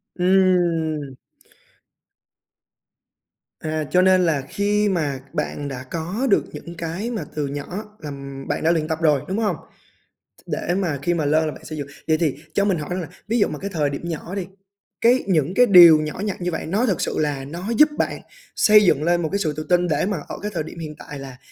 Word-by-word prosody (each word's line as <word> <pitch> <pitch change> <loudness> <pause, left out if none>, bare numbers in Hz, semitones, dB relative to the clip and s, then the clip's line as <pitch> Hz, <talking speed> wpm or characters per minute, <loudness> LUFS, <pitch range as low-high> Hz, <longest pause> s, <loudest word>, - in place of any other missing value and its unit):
Ừm. 175 -6 +2 2.5
À, 155 0 -2
cho 180 - +5
nên 185 -1 +4
là 150 -4 +1
khi 205 +1 +1
mà 150 -7 -1
bạn 145 -1 -3
đã 130 -2 -6
có 175 - -3
được - - +4
những 170 - -8
cái 170 +8 -4
mà 220 - -3
từ 150 -2 -1
nhỏ 185 +10 -6
là 150 -2 -7 0.4
bạn - - -2
đã 165 - +4
luyện 155 -2 0
tập 160 0 -3
rồi, 150 -4 +3
đúng 190 +3 -2
hông? 205 -7 +1 0.9
Để 175 - -2
mà 165 -8 -1
khi 175 +4 +1
mà 160 -3 -1
lên 155 +2 +3
là 155 - -2
bạn - - -14
xây 155 - -6
dựng. 140 -1 -5 0.2
Vậy 155 0 +3
thì 155 -5 0 0.2
cho 200 - +2
mình 190 -4 +1
hỏi 150 +1 -6
rằng 180 +1 -1
là 160 - -6 0.2
ví 230 +2 +1
dụ - - +4
mà - - -6
cái 200 - -4
thời 150 -3 +1
điểm 140 - -5
nhỏ 165 +3 -5
đi, 190 -3 -3 0.5
cái 245 +3 +4
những 165 -2 +1
cái 245 +4 +6
điều 175 -6 +9
nhỏ 155 +3 -5
nhặt 200 -3 -4
như 180 0 -1
vậy - - -4
nó 205 +9 +1
thật 195 -8 0
sự - - -1
là 145 -3 -1
nó 175 +8 -6
giúp 300 0 +7
bạn - - -1 0.3
xây 210 0 +6
dựng 150 -5 +3
lên 175 +1 +2
một 160 - -1
cái 200 - 0
sự 155 -5 -1
tự 155 - -3
tin, 180 0 +3
để 155 +1 +1
mà 200 -3 -1
ở - - -6
cái 210 +1 -4
thời 165 -3 -1
điểm 170 +2 -10
hiện 155 -2 -6
tại 145 - -8
là 135 -2 -9
170 Hz, 225 wpm, -22 LUFS, 150-190 Hz, 2.5 s, điều